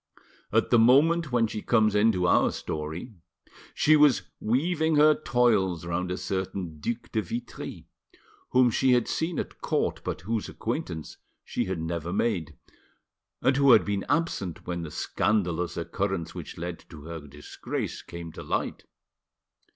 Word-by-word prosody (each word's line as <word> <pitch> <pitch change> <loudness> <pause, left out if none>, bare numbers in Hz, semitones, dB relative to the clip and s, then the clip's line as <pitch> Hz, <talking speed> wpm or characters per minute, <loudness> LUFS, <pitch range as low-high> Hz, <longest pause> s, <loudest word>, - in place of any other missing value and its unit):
At - - +2
the 120 - +6
moment 145 +7 +4
when 120 -2 +3
she 110 -1 -4
comes 110 -3 +3
into 105 -3 +3
our 85 - +4
story 80 +9 -5 0.6
she 155 - +5
was 150 -4 +5 0.2
weaving 160 +7 +1
her 150 +1 +7
toils 110 - +1
round 90 +1 -2
a 90 - -2
certain 95 -5 -4
Duc 120 +9 -4
de 110 - +1
Vitry, 115 +6 -6 0.6
whom 125 -1 +4
she 130 +3 +3
had 120 -2 +2
seen 165 +1 -2
at - - -5
court, - - -1
but - - -4
whose 110 +4 -2
acquaintance 80 -2 -4 0.3
she - - -2
had 95 -2 -3
never 85 +1 -3
made, 95 -9 -1 0.9
and 130 +2 +3
who 140 -3 +7
had 110 - +5
been 100 -1 -1
absent 95 - -1
when 85 -1 -3
the 80 - -5
scandalous 90 0 -1
occurrence 85 0 -2
which 85 -4 -8
led 85 0 -5
to 75 -3 -11
her 85 +1 -6
disgrace 75 +1 -5
came 85 -1 -8
to - - -9
light. - - -3
100 Hz, 150 wpm, -27 LUFS, 85-125 Hz, 0.9 s, her